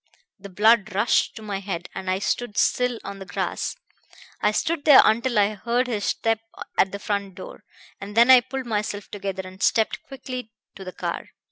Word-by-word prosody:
The 200 Hz, +1 st, -10 dB
blood 210 Hz, +1 st, +3 dB
rushed 205 Hz, +4 st, +2 dB
to 220 Hz, -, -9 dB
my 200 Hz, -2 st, -4 dB
head, 185 Hz, -3 st, -5 dB
and 190 Hz, -1 st, -5 dB
I 185 Hz, -, +1 dB
stood 210 Hz, +2 st, -2 dB
still 250 Hz, -1 st, +2 dB
on 200 Hz, 0 st, -7 dB
the 195 Hz, -, -8 dB
grass. -, -, -3 dB, 0.7 s
I 210 Hz, -, +3 dB
stood 320 Hz, +7 st, -1 dB
there 290 Hz, -3 st, +9 dB
until 235 Hz, +2 st, +2 dB
I 205 Hz, +1 st, +3 dB
heard 235 Hz, +4 st, 0 dB
his 220 Hz, -5 st, -2 dB
step 225 Hz, -1 st, 0 dB, 0.4 s
at 190 Hz, -, +3 dB
the 200 Hz, -, -4 dB
front 200 Hz, -2 st, -3 dB
door, 190 Hz, -, -10 dB, 0.4 s
and 205 Hz, +2 st, -8 dB
then 240 Hz, +2 st, +7 dB
I 255 Hz, -1 st, +9 dB
pulled 260 Hz, +1 st, -6 dB
myself 210 Hz, -2 st, -3 dB
together 195 Hz, -2 st, -4 dB
and 185 Hz, +1 st, -12 dB
stepped 220 Hz, -2 st, +1 dB
quickly 255 Hz, -4 st, -8 dB, 0.2 s
to 195 Hz, -, -9 dB
the 185 Hz, -, -7 dB
car. -, -, -5 dB
210 Hz, 195 wpm, -24 LUFS, 195-240 Hz, 0.7 s, there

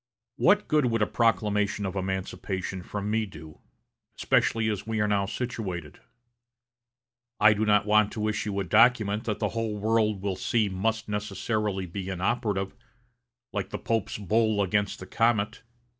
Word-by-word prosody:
What 210 Hz, +6 st, +4 dB
good 150 Hz, -4 st, +3 dB
would 115 Hz, -2 st, +1 dB
a -, -, +3 dB
proclamation 105 Hz, -3 st, +1 dB
of 95 Hz, 0 st, -4 dB
emancipation 95 Hz, 0 st, -3 dB
from 100 Hz, +3 st, -4 dB
me 110 Hz, 0 st, 0 dB
do, 80 Hz, -4 st, -12 dB, 0.6 s
especially 115 Hz, -1 st, +2 dB
as 105 Hz, -1 st, -2 dB
we 110 Hz, -1 st, -1 dB
are 105 Hz, -, +2 dB
now 100 Hz, -1 st, +1 dB
situated? 95 Hz, -, -5 dB, 1.4 s
I 105 Hz, 0 st, +7 dB
do 105 Hz, +1 st, 0 dB
not 105 Hz, 0 st, +4 dB
want 105 Hz, 0 st, +4 dB
to 110 Hz, -1 st, -2 dB
issue 105 Hz, -2 st, -2 dB
a -, -, 0 dB
document 110 Hz, +1 st, +3 dB
that 105 Hz, -3 st, -1 dB
the 105 Hz, -, -1 dB
whole 115 Hz, -1 st, -3 dB
world 105 Hz, -2 st, +1 dB
will 100 Hz, -2 st, -1 dB
see 110 Hz, -4 st, +1 dB
must 110 Hz, +4 st, -1 dB
necessarily 105 Hz, -1 st, -2 dB
be 95 Hz, +2 st, -6 dB
inoperative, 95 Hz, +1 st, -1 dB, 0.8 s
like 100 Hz, -2 st, -2 dB
the -, -, -4 dB
Pope's 115 Hz, -3 st, -2 dB
bull 105 Hz, 0 st, +1 dB
against 100 Hz, +1 st, 0 dB
the 95 Hz, -, -9 dB
comet.... 115 Hz, 0 st, +1 dB
105 Hz, 155 wpm, -27 LUFS, 95-110 Hz, 1.4 s, I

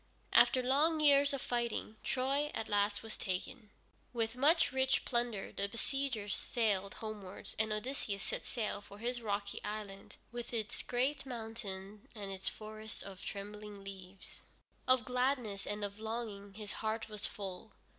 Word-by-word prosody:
After 255 Hz, -, +7 dB
long 300 Hz, +5 st, +4 dB
years 285 Hz, -1 st, +7 dB
of 275 Hz, -2 st, -1 dB
fighting, 235 Hz, -2 st, 0 dB
Troy 275 Hz, +3 st, +2 dB
at 225 Hz, -, -1 dB
last 205 Hz, +1 st, +2 dB
was 225 Hz, -, -4 dB
taken. 205 Hz, +4 st, -3 dB, 0.4 s
With 230 Hz, -1 st, 0 dB
much 315 Hz, +5 st, +5 dB
rich 265 Hz, 0 st, +3 dB
plunder 235 Hz, -5 st, 0 dB
the 200 Hz, 0 st, 0 dB
besiegers 230 Hz, -2 st, -1 dB
sailed 205 Hz, -5 st, +1 dB
homewards, 210 Hz, -4 st, -6 dB
and 220 Hz, 0 st, +3 dB
Odysseus 215 Hz, -2 st, -1 dB
set -, -, -2 dB
sail 215 Hz, -3 st, -1 dB
for 200 Hz, 0 st, -12 dB
his 240 Hz, +2 st, -1 dB
rocky 200 Hz, -2 st, -1 dB
island, 205 Hz, -2 st, -5 dB
with 240 Hz, 0 st, -4 dB
its 220 Hz, -2 st, -1 dB
great 270 Hz, +3 st, +1 dB
mountain, 215 Hz, -4 st, -5 dB
and 200 Hz, -2 st, -4 dB
its 190 Hz, -1 st, +1 dB
forests 215 Hz, 0 st, -8 dB
of 195 Hz, -1 st, -8 dB
trembling 205 Hz, 0 st, -5 dB
leaves. 190 Hz, -1 st, -8 dB, 0.5 s
Of 255 Hz, -3 st, +5 dB
gladness 250 Hz, -5 st, +1 dB
and 205 Hz, 0 st, -1 dB
of 200 Hz, +1 st, -6 dB
longing 220 Hz, -3 st, -4 dB
his 210 Hz, -2 st, -5 dB
heart 220 Hz, 0 st, 0 dB
was 210 Hz, -1 st, +1 dB
full. 195 Hz, +1 st, -6 dB
220 Hz, 150 wpm, -36 LUFS, 200-250 Hz, 0.5 s, After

